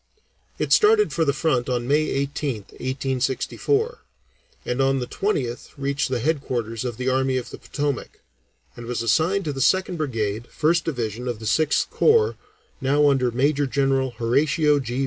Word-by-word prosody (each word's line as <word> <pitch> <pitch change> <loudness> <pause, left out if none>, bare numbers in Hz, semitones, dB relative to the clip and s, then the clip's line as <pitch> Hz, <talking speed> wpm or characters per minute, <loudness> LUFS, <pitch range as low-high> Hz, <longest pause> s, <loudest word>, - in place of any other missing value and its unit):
It - - +1
started 425 0 +4
for 165 - +1
the 140 - +3
front 140 -4 0
on 120 -1 -1
May 150 +3 +2
18th 135 -5 -3
(1864), 130 - -1 0.7
and 125 +2 -1
on 135 0 +2
the 125 - -2
20th 125 - -3
reached 140 0 -1
the 130 - 0
headquarters 120 -5 -2
of 120 -3 -4
the 130 - -3
Army 130 0 +1
of 125 - -5
the - - -9
Potomac, 145 -3 -4 0.6
and 120 -1 -9
was 120 -1 -2
assigned 165 - +2
to 150 - -2
the 135 - -4
Second 185 +3 +2
Brigade, 115 -6 -2
First 165 +2 +1
Division, 120 -5 -3
of 120 -2 -2
the 110 - -9
Sixth 155 +8 +2
Corps, 445 -1 +3 0.5
now 145 +2 +3
under 130 -2 +2
Major 140 +4 +1
General 135 0 +1
Horatio 145 +5 +2
G. 125 -1 -4
135 Hz, 165 wpm, -23 LUFS, 125-150 Hz, 0.7 s, started